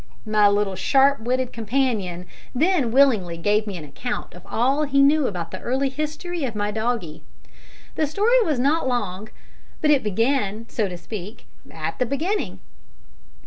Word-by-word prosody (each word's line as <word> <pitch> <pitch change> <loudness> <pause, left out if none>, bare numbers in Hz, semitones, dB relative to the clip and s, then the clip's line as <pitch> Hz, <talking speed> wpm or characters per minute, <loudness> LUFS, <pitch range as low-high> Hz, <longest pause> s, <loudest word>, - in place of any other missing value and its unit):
My 215 -1 +4
little 205 -1 +1
sharp 275 +8 +3
witted 250 +2 -1
companion 220 -7 -1 0.3
then 310 -2 +2
willingly 225 -10 +3
gave 210 +5 +1
me 195 -3 -4
an 160 - -7
account 240 - -5
of 180 - -12
all 265 +6 +1
he 275 -2 +3
knew 290 -1 +4
about 170 -4 -4
the 185 - -6
early 265 +2 0
history 305 +4 -4
of 240 -5 -3
my 205 0 -1
doggie. 220 -6 -2 0.7
The 310 - 0
story 445 - +3
was 315 - +1
not 280 +4 +2
long, 210 -4 -2 0.5
but 300 - +3
it 285 -3 +4
began, 225 0 0
so 210 -4 -1
to 180 - -6
speak, 210 +3 -8 0.3
at - - -5
the 250 - +1
beginning. 335 - -2
245 Hz, 160 wpm, -23 LUFS, 205-280 Hz, 0.7 s, My